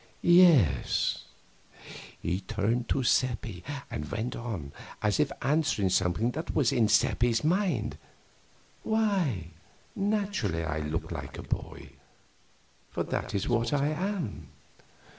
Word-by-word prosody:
"Yes." 165 - +4 0.9
He 90 +3 -1
turned 110 +5 -1
to 135 - +1
Seppi, 120 -6 0 0.3
and 75 0 -4
went 110 +3 -3
on 100 -12 -5 0.3
as 105 +4 +2
if 150 -2 +2
answering 140 - +1
something 95 +6 +1
that 160 +5 -5
was 140 -6 +3
in 115 -4 +3
Seppi's 115 +2 +2
mind: 170 - 0 0.8
"Why, 190 - 0 0.4
naturally 200 - -1
I 80 -1 -2
look 75 +3 -3
like 70 -4 -6
a - - -7
boy, - - -5 1.0
for - - -2
that - - -3
is 100 +1 -1
what 120 +2 +1
I 145 0 +2
am. 180 - -3
120 Hz, 120 wpm, -29 LUFS, 95-155 Hz, 1.0 s, Yes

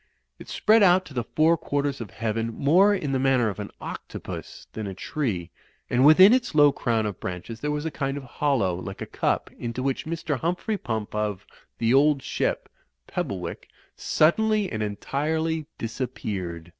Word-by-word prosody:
It - - -11
spread 220 +1 +4
out 185 -1 +5
to 145 - -12
the 120 -2 -1
four 155 +7 +3
quarters 140 -3 -2
of 110 - -6
heaven 115 +2 -2
more 175 - +4
in 185 -9 -1
the 135 - +1
manner 130 -4 +3
of 100 - -6
an 100 - -5
octopus - - -7
than 110 -2 -4
a 95 - -6
tree, 95 - -3 0.4
and 125 +1 +3
within 185 - +8
its 250 -10 0
low 145 -1 +7
crown 115 -5 0
of 105 -3 -4
branches 95 +6 -6
there 150 - -2
was 150 +1 -2
a 160 - -2
kind 135 -1 -2
of 140 - -6
hollow, 130 -7 0
like 95 +2 -6
a - - -5
cup, - - -1
into 120 +2 -4
which 135 +2 -2
Mr. 160 -4 -2
Humphrey 180 - -1
Pump, 110 -2 -4
of 105 -2 -2 0.3
"The 115 +1 +2
Old 140 0 +4
Ship," - - -1 0.4
Pebblewick, - - -4 0.3
suddenly 215 +5 +2
and 110 - -3
entirely 155 +9 -2
dis 115 +3 -5
appeared. 90 -9 -4
135 Hz, 180 wpm, -25 LUFS, 110-155 Hz, 0.4 s, within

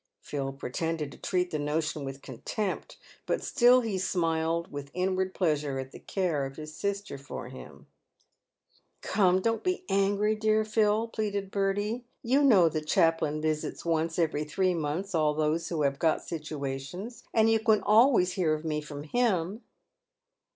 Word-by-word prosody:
Phil 135 -2 -4
pretended 150 +3 -3
to - - -12
treat 180 -1 0
the 155 - -2
notion 150 0 -1
with 135 0 -7
contempt, 185 - -4 0.3
but - - 0
still 250 0 +5
he 215 -5 -2
smiled 165 -1 0
with 145 -1 -6
inward 185 +1 0
pleasure 150 -6 0
at 130 0 -5
the - - -11
care 175 -7 -1
of 135 - -11
his 155 0 -8
sister 200 -7 -3
for 135 - -7
him. 65 - -12 0.6
" - - -40
Come, 185 -2 +2
don't 225 -1 0
be 365 0 -1
angry, 200 +2 +2
dear 215 0 +2
Phil," 215 +1 +2
pleaded 205 -3 -3
Bertie; 205 +4 -1
" - - -50
you 280 +2 +5
know 205 -11 +6
the 155 -1 -1
chaplain 155 -1 +2
visits 155 +1 -2
once 165 0 0
every 155 -3 +1
three 185 +4 +1
months 165 +5 -3
all 155 -2 +2
those 155 +2 0
who 160 -3 -1
have 140 0 0
got 160 -2 +2
situations, 155 - -5
and 225 0 +4
you 225 - +4
can 220 -1 +3
always 215 -3 +5
hear 165 -5 +1
of 155 +1 -8
me 150 -1 -1
from 145 -1 -8
him." 200 +1 0
170 Hz, 165 wpm, -29 LUFS, 150-205 Hz, 0.6 s, know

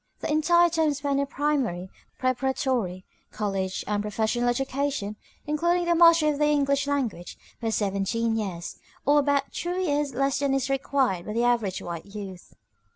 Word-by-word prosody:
The - - -2
entire 345 +3 +4
time 320 -2 +1
spent 280 0 -1
in 280 - 0
primary, 270 -12 -1 0.3
preparatory, 255 -7 -1 0.3
college, 195 -3 -2
and 205 0 -1
professional 220 +3 0
education, 270 -4 -1 0.3
including 345 +4 +1
the 345 - +3
mastery 335 -2 +6
of 290 - -4
the 300 - +4
English 280 -1 +2
language, 250 -11 -2 0.2
was 225 -1 0
seventeen 210 +3 0
years, 185 -6 -4 0.3
or 290 +1 +5
about 280 -1 +1
two 350 +1 -3
years 290 -6 0
less 275 +1 +1
than 280 -1 +1
is 270 0 -1
required 265 -9 0
by 210 - -3
the 235 +2 +1
average 230 -6 +1
white 170 +1 -6
youth. 195 -3 -9
265 Hz, 155 wpm, -26 LUFS, 210-290 Hz, 0.3 s, mastery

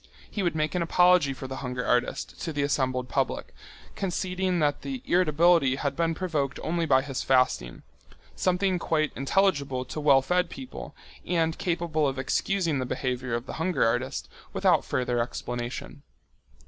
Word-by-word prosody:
He 205 - -2
would 175 -3 0
make 155 0 0
an 180 - 0
apology 180 -3 +4
for 135 0 -6
the 130 0 -6
hunger 125 -1 -4
artist 125 0 -1
to 165 - -3
the 145 -2 -1
assembled 130 -3 0
public, - - -2 0.4
conceding 185 -1 -1
that 150 -3 +1
the 265 -2 -5
irritability 170 - +4
had 140 0 -2
been 165 -1 0
provoked 155 -7 -2
only 170 0 0
by 130 -2 +4
his 135 -2 -4
fasting, 125 - +1 0.5
something 185 0 +1
quite 155 -3 0
intelligible 140 -4 +1
to 155 - -6
well 140 -3 +5
fed 180 +4 +1
people 260 - -8 0.3
and 165 -2 0
capable 165 -4 0
of 135 -1 -2
excusing 165 +3 0
the 130 - -1
behaviour 125 -2 -2
of 120 +1 -4
the - - -7
hunger 165 -6 +2
artist 115 - -1 0.3
without - - +3
further 125 -1 -1
explanation. 120 +3 -4
150 Hz, 160 wpm, -27 LUFS, 130-175 Hz, 0.5 s, well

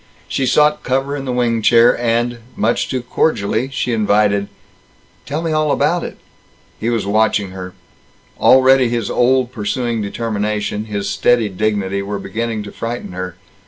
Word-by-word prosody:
She 135 - -1
sought 150 +3 +3
cover 135 +3 -1
in 135 -1 -5
the 130 - -2
wing 120 -2 0
chair 115 +2 +5
and 120 0 0 0.2
much 105 -3 0
too 130 -2 -2
cordially 125 -2 0
she 125 -2 -1
invited: 105 -2 +2 0.8
"Tell 150 +3 -3
me 165 - -1
all 155 -1 +1
about - - +1
it." - - -7 0.6
He 115 - -1
was 115 -3 -1
watching 105 -1 +1
her. 90 0 -8 0.6
Already 130 -1 +5
his 115 -3 -2
old 125 0 +2
pursuing 115 +1 -2
determination, 105 0 -2
his 100 -2 -3
steady 105 +3 +2
dignity, 100 0 -1
were 100 +1 -4
beginning 110 +3 -3
to 105 - -9
frighten 115 -2 -5
her. 90 -1 -5
115 Hz, 155 wpm, -18 LUFS, 105-125 Hz, 0.8 s, chair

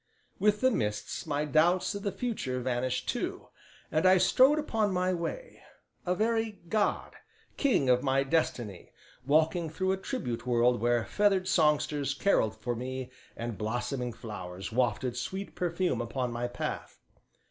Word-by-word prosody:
With 210 +1 +2
the 260 0 +4
mists 105 - -2
my 150 0 0
doubts 165 +7 +3
of 200 - -5
the 200 - -1
future 190 - -3
vanished 125 0 -1
too, - - -3 0.4
and 155 +1 +1
I 185 0 +7
strode 260 +10 +5
upon 225 -9 0
my 185 0 +1
way, 335 - -5 0.5
a 180 - +2
very 225 0 0
god, 210 +1 0 0.4
king 255 - +2
of 125 0 +4
my 135 0 +2
destiny, 120 - -1 0.4
walking 160 +3 +2
through 185 +4 -1
a 190 - 0
tribute 125 - -4
world 120 -1 +3
where 120 -1 +2
feathered 200 -3 +2
songsters 150 -3 +2
carolled 110 - +2
for 120 +2 -3
me 130 +1 -5 0.3
and 115 -2 -5
blossoming 120 +3 -2
flowers 95 -5 -7
wafted 120 +1 0
sweet 190 +9 -4
perfume 175 -3 -1
upon 125 +1 -2
my 120 +1 -2
path. 120 - -5
145 Hz, 145 wpm, -30 LUFS, 120-190 Hz, 0.5 s, I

